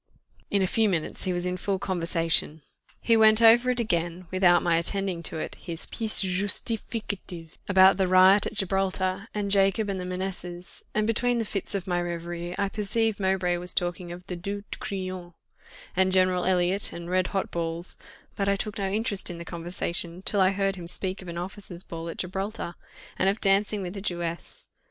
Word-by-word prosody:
In 200 -1 +2
a - - +3
few 220 +3 +2
minutes 170 -5 -2
he 185 - 0
was 175 0 -1
in 180 0 -1
full 195 +1 -1
conversation. 165 -4 +1 0.4
He 230 - +3
went 220 0 +7
over 230 +2 +7
again, 180 -7 -1
without 180 -2 +4
my 170 -1 +3
attending 185 0 0
to 165 - +1
it, - - -4
his 165 -2 -5
pièce 220 -3 +2
justificative 195 -2 -3
about 190 -1 +6
the 190 -1 +2
riot 185 +2 +6
at - - -7
Gibraltar, 190 0 -1
and 205 -1 -2
Jacob, 195 +1 +3
and 195 -1 -2
the - - -4
Manessas; 180 -1 -5
and 215 0 +2
between 240 +2 +2
the 230 - -1
fits 200 -1 -3
of 190 -2 -2
my 175 -2 0
reverie, 175 0 -4
I 200 -1 +1
perceived 215 +1 0
Mowbray 190 -2 +1
was 180 +1 -2
talking 175 0 -2
of 175 +1 -9
the 180 - -5
Due 200 +3 -5
de - - -4
Crillon 185 -7 -5 0.6
and 190 0 +3
General 185 -1 +3
Elliot, 185 +2 +2
and 170 0 -7
red 185 0 +1
hot 195 -2 -2
balls; 170 +1 0 0.4
but 200 -1 0
I 200 - +3
took 210 +1 -4
no 195 -1 -1
interest 205 -1 0
in 175 - -6
the 170 - -8
conversation, 170 +1 -4
till 200 -1 +1
I 185 - +5
heard 195 0 0
him 170 -2 -7
speak 185 +2 -3
of 185 - -11
an 170 0 -6
officers' 180 0 -5
ball 165 0 -6
at - - -7
Gibraltar, 190 0 -4 0.5
and 190 - +4
of 200 +3 -1
dancing 200 +1 +2
with 180 +2 -6
a 195 - -5
Jewess. 170 -3 -4
185 Hz, 195 wpm, -26 LUFS, 175-200 Hz, 0.6 s, went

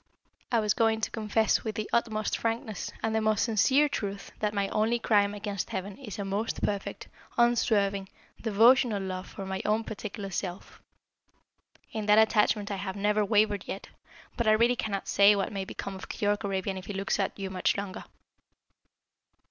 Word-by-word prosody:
I 235 - +3
was 210 -2 +2
going 225 -1 +2
to - - -1
confess 220 0 +1
with 220 -1 -3
the 215 -2 -3
utmost 215 -2 +1
frankness 225 -3 -3
and 225 - 0
the 220 - +1
most 215 -1 +2
sincere 260 +6 +3
truth 200 -7 -4
that 210 -1 0
my 200 -1 0
only 225 +3 +1
crime 205 -3 +2
against 205 -2 -4
Heaven 190 +1 -4
is 220 -9 -8
a 200 - -3
most 205 +4 -2
perfect, 200 -1 -2 0.3
unswerving, 205 -5 +2 0.3
devotional 230 0 +4
love 185 -1 -4
for 195 - -8
my 190 0 -3
own 215 +2 +1
particular 205 -2 -6
Self. 180 0 -5 1.1
In 215 -1 -4
that 210 0 +6
attachment 210 -1 +3
I 200 - -2
have 190 0 -4
never 210 +1 +1
wavered 205 -1 +2
yet 195 - -6 0.5
but 235 - -1
I 215 - +6
really 235 +3 +4
cannot 200 -4 -3
say 200 +1 +6
what 195 - -1
may 195 -1 -3
become 195 - -6
of 190 - -9
Keyork 205 0 0
Arabian 190 -1 -2
if 185 - -12
he 205 - -4
looks 195 +1 -1
at 195 - -1
you 195 -1 -4
much 185 +1 +1
longer." 200 -2 -5
210 Hz, 180 wpm, -28 LUFS, 195-220 Hz, 1.1 s, that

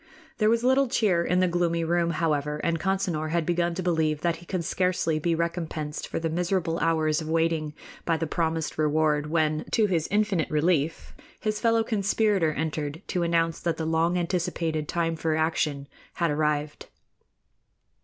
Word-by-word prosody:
There 215 -1 +4
was 230 +1 +2
little 260 +2 +4
cheer 195 -8 +2
in 180 +2 +1
the 185 - +3
gloomy 170 -1 0
room, 170 +1 +1
however, 150 -3 0
and 165 -1 0
Consinor 185 -4 -1
had 165 0 0
begun 175 0 0
to 185 - -3
believe 160 -3 +1
that 170 0 0
he 175 - -15
could 180 -4 -2
scarcely 180 -4 0
be 165 +2 +1
recompensed 165 -3 -3
for - - -4
the 165 - -1
miserable 170 0 -1
hours 160 -1 +1
of 155 - -6
waiting 160 -2 0 0.3
by 165 -1 +1
the 165 - -2
promised 160 -1 -2
reward 150 -1 +2
when, 155 -1 +1
to 220 - +4
his 170 -6 0
infinite 205 -5 +1
relief, 155 0 0 0.3
his 215 -1 -2
fellow 230 0 +3
conspirator 205 -5 +1
entered 155 +1 -3
to 180 - 0
announce 165 -1 +1
that 170 -2 -1
the 160 - -3
long 165 +2 +1
anticipated 170 -3 -1
time 165 0 -1
for 160 0 -1
action 155 -3 0 0.3
had 170 -3 0
arrived. 150 0 -1
165 Hz, 170 wpm, -26 LUFS, 155-175 Hz, 0.3 s, There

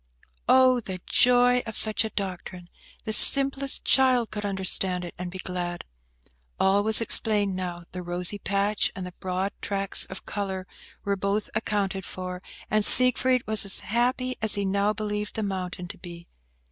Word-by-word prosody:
Oh, 255 -1 +4
the 190 -5 -8
joy 245 0 +3
of 220 - -6
such 215 +1 +2
a 220 - -4
doctrine! 185 -3 -7 0.3
The 220 - -4
simplest 275 +3 +4
child 255 -3 +2
could 210 - -6
understand 190 -2 -2
it, 175 - -9
and 180 0 -5
be 185 - -9
glad! 180 -2 -6 0.7
All 195 +1 +2
was 220 +2 +4
explained 210 -4 +4
now, 180 -2 -6
too; - - -19
the 180 - -7
rosy 180 +3 -3
patch 200 +1 -1
and 185 - -7
the 180 - -10
broad 190 +1 -3
tracts 195 -2 +2
of 190 - -10
colour 190 -2 -5 0.4
were 200 0 -2
both 200 +2 -3
accounted 200 -3 -3
for, 180 0 -8 0.3
and 215 0 +2
Siegfried 255 +1 +5
was 215 0 +5
as 200 -1 +3
happy 250 +3 -2
as 220 -1 +4
he 200 -1 -2
now 200 +2 0
believed 210 -1 -5
the 220 - -3
mountain 180 -2 -5
to - - -10
be. 170 -1 -12
200 Hz, 170 wpm, -24 LUFS, 185-220 Hz, 0.7 s, Siegfried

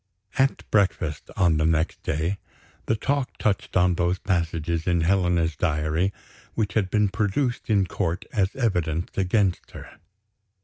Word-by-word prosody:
At 135 +1 +1
breakfast, 90 -7 +1
on 85 -4 +3
the 80 - +1
next 80 0 0
day, 85 +6 -1 0.5
the 110 - +2
talk 140 +3 -1
touched 100 -3 0
on 90 0 +4
those 90 +1 +1
passages 85 -3 -1
in 85 -2 +2
Helena's 85 -2 +2
diary, 75 +5 0 0.4
which 110 -3 -1
had 100 -4 +1
been 105 +1 +3
produced 110 +6 -1
in 100 -3 +3
court 90 -1 -2
as 100 -1 +1
evidence 90 - -1
against 95 -1 +1
her. - - -11
90 Hz, 140 wpm, -25 LUFS, 80-105 Hz, 0.5 s, on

